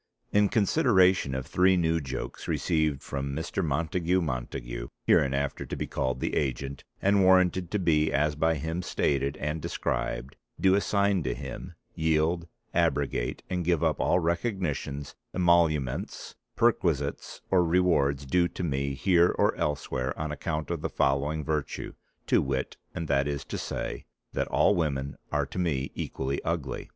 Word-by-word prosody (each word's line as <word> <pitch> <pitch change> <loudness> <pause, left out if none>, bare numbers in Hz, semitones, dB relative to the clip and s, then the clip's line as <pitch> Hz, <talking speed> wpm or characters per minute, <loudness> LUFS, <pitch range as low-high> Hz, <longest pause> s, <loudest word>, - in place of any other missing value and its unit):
in 105 -1 +4
consideration 95 - +3
of 65 -1 -3
three 95 +1 +3
new 80 -1 +1
jokes 65 -1 -6
received 80 -5 0
from 70 0 -4
Mr. 85 +4 -2
Montagu 85 +4 +1
Montague, - - -4 0.2
hereinafter 70 +1 +2
to - - -5
be - - -3
called 65 -1 -2
the - - -2
agent, 70 0 -2 0.2
and 100 0 +4
warranted 95 -1 +4
to 105 - 0
be 80 -5 +2
as 75 +2 +2
by 80 +2 +2
him 80 +4 -3
stated 70 -5 0
and 75 +2 -3
described, 65 0 -3 0.2
do 95 -1 +4
assign 100 -1 +2
to 65 -5 -2
him, - - -7 0.2
yield, 80 +2 +1 0.3
abrogate - - 0
and 90 -1 -2
give 85 -2 +1
up - - +1
all 85 - +3
recognitions, 85 - -2 0.2
emoluments, 85 -7 +1 0.2
perquisites 85 - 0
or 90 -2 +5
rewards 80 -6 +2
due 85 +5 +3
to 90 - -6
me 70 -3 -1
Here 90 +2 +4
or 105 +1 +2
Elsewhere 70 -4 -2
on 80 0 -2
account 75 +2 -3
of 85 -3 -2
the - - -2
following 70 +3 0
virtue, 75 -2 -3 0.3
to - - +3
wit 65 0 -2 0.2
and 80 - -3
that 70 -1 +2
is 70 -1 -3
to - - -5
say..... - - -4 0.3
that - - -1
all - - +4
women 70 -6 -1 0.2
are 75 -1 +1
to 75 - -6
me 70 -7 -1
equally 70 +1 -3
ugly." 80 -6 -3
80 Hz, 155 wpm, -28 LUFS, 70-90 Hz, 0.3 s, or